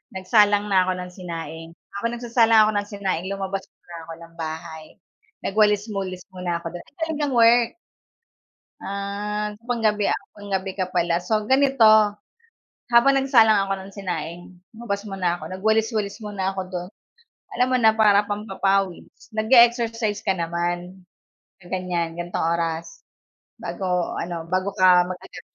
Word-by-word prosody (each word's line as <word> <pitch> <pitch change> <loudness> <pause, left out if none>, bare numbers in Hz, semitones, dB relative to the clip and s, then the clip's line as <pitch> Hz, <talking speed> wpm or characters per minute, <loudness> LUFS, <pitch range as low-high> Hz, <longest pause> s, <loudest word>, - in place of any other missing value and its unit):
nagsalang 205 +1 +3
na 185 -1 +4
ako - - +2
ng 180 0 -7
sinaing 165 -3 -7 0.3
ako 235 - -5
nagsasalang 235 -1 +3
ako - - +1
ng 205 0 -1
sinaing 190 -4 -3
lumabas 195 0 -3
muna 170 - -15
ako 165 - -7
ng 165 0 -14
bahay 160 0 -6 0.6
nagwalis-walis 205 -3 0
muna 180 -2 -3
ako 170 0 -7
dun, 175 - -7
ay - - -25
galing 320 -2 -2
kang 285 -3 -1
work. 235 0 +5 1.1
Ah, 205 +2 -4 0.2
panggabi 215 -4 +1 0.3
panggabi 195 -2 -3
ka 185 - +1
pala 170 -1 +2
so 215 +4 -1
ganito 270 -2 +3 1.1
habang 255 +4 +6
nagsalang 235 -6 +5
ako 195 - -2
ng 190 0 -11
sinaing 175 -3 -5 0.3
lumabas 200 -3 -4
muna 185 -3 -1
ako 155 - -9
nag-walis-walis 215 +1 0
muna 195 -2 -2
ako 190 - -4
do'n 180 -1 -5 0.7
alam 250 - +2
mo 255 - +3
na 220 -2 +5
para 210 -2 +5
pampapawis 195 -2 -2
nag-e-exercise 230 -2 +3
ka 195 - +4
naman 175 +2 -3 0.6
sa 175 - -19
ganyan 175 -3 -2
gantong 175 -1 -2
oras 165 - -4 0.6
bago 180 -2 -2
ano 170 -1 -5
bago 185 +2 0
ka 180 -1 +6
mag-ano? 185 0 -8
195 Hz, 140 wpm, -23 LUFS, 180-220 Hz, 1.1 s, habang